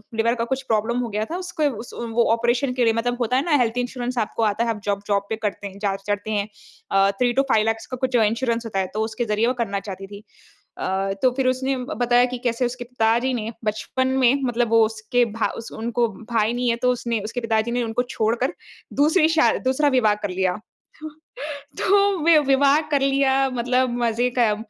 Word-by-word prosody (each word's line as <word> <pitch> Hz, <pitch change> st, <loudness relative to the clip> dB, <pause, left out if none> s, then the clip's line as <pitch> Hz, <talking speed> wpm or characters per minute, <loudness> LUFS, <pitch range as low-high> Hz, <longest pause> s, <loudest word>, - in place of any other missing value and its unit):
Liver 230 Hz, +2 st, +2 dB
का 230 Hz, -, -2 dB
कुछ 265 Hz, +2 st, -2 dB
problem 230 Hz, +1 st, 0 dB
हो 240 Hz, -2 st, -2 dB
गया 210 Hz, +1 st, -2 dB
था। 350 Hz, -, -2 dB
उसको 320 Hz, -5 st, -1 dB
उस -, -, -13 dB
वो 235 Hz, 0 st, 0 dB
ऑपरेशन 240 Hz, +3 st, +1 dB
के 250 Hz, -1 st, +1 dB
लिए 225 Hz, -1 st, +3 dB
मतलब 245 Hz, +2 st, -1 dB
होता 250 Hz, +2 st, +1 dB
है 275 Hz, -, 0 dB
ना 310 Hz, -4 st, +3 dB
हेल्थ-इंश्योरेंस 245 Hz, +1 st, -3 dB
आपको 225 Hz, 0 st, -1 dB
आता 210 Hz, +2 st, +1 dB
है 235 Hz, -, -1 dB
आप 210 Hz, -2 st, -6 dB
जॉब 200 Hz, 0 st, -1 dB
जॉब 200 Hz, -1 st, +1 dB
पे 220 Hz, -, -1 dB
करते 200 Hz, 0 st, -5 dB
हैं 195 Hz, +1 st, -11 dB
जहाँ 195 Hz, -2 st, -1 dB
चढ़ते 205 Hz, +1 st, -2 dB
हैं। 205 Hz, -1 st, 0 dB, 0.4 s
अ, 195 Hz, 0 st, +4 dB
3 245 Hz, -1 st, +4 dB
टू 275 Hz, -, +3 dB
5 215 Hz, 0 st, +3 dB
लेख्स 225 Hz, 0 st, -1 dB
का -, -, -2 dB
कुछ 260 Hz, 0 st, -1 dB
इंश्योरेंस 230 Hz, +1 st, +1 dB
होता 195 Hz, -4 st, -2 dB
है 190 Hz, -, 0 dB
तो 215 Hz, -, 0 dB
उसके 225 Hz, +2 st, -3 dB
ज़रिए 215 Hz, +2 st, +1 dB
वो 255 Hz, -, +2 dB
करना 200 Hz, -2 st, -3 dB
चाहती 195 Hz, -1 st, -8 dB
थी। 205 Hz, +1 st, -11 dB, 0.6 s
अ, 195 Hz, +1 st, -1 dB
तो 255 Hz, -, +5 dB
फ़िर 260 Hz, -1 st, +1 dB
उसने 260 Hz, +1 st, 0 dB
ब 255 Hz, +5 st, -5 dB
बताया 245 Hz, 0 st, +3 dB
कि 250 Hz, 0 st, -5 dB
कैसे 240 Hz, +1 st, +1 dB
उसके 245 Hz, 0 st, -5 dB
पिताजी 235 Hz, +1 st, +1 dB
ने 225 Hz, -1 st, -3 dB
बचपन 260 Hz, +5 st, -1 dB
में 245 Hz, +1 st, +6 dB
मतलब 240 Hz, -1 st, 0 dB
वो 225 Hz, -1 st, +5 dB
उसके 220 Hz, +3 st, 0 dB
भा 225 Hz, -, 0 dB
उस 230 Hz, -, -8 dB
उनको 235 Hz, +1 st, -1 dB, 0.2 s
भाई 225 Hz, 0 st, +2 dB
नहीं 245 Hz, 0 st, -1 dB
है 230 Hz, -, +1 dB
तो 250 Hz, -, +4 dB
उसने 235 Hz, -2 st, -2 dB
उसके 230 Hz, +3 st, -4 dB
पिताजी 225 Hz, 0 st, 0 dB
ने 245 Hz, 0 st, 0 dB
उनको 230 Hz, +2 st, -1 dB
छोड़ 230 Hz, -2 st, -1 dB
कर 260 Hz, +7 st, -1 dB, 0.4 s
दूसरी 310 Hz, +3 st, +4 dB
शा 325 Hz, -1 st, +4 dB
दूसरा 265 Hz, +3 st, +2 dB
विवाह 235 Hz, -6 st, +3 dB
कर 205 Hz, -, -2 dB
लिया। 185 Hz, 0 st, 0 dB, 0.5 s
तो, 310 Hz, -, -6 dB, 0.7 s
तो 400 Hz, -1 st, +3 dB
वि 335 Hz, -1 st, +6 dB
विवाह 275 Hz, +2 st, +4 dB
कर 280 Hz, -, +3 dB
लिया 270 Hz, 0 st, +2 dB
मतलब 250 Hz, +1 st, +1 dB
मज़े 235 Hz, +2 st, +1 dB
क 215 Hz, -3 st, +3 dB
235 Hz, 225 wpm, -22 LUFS, 220-255 Hz, 0.7 s, में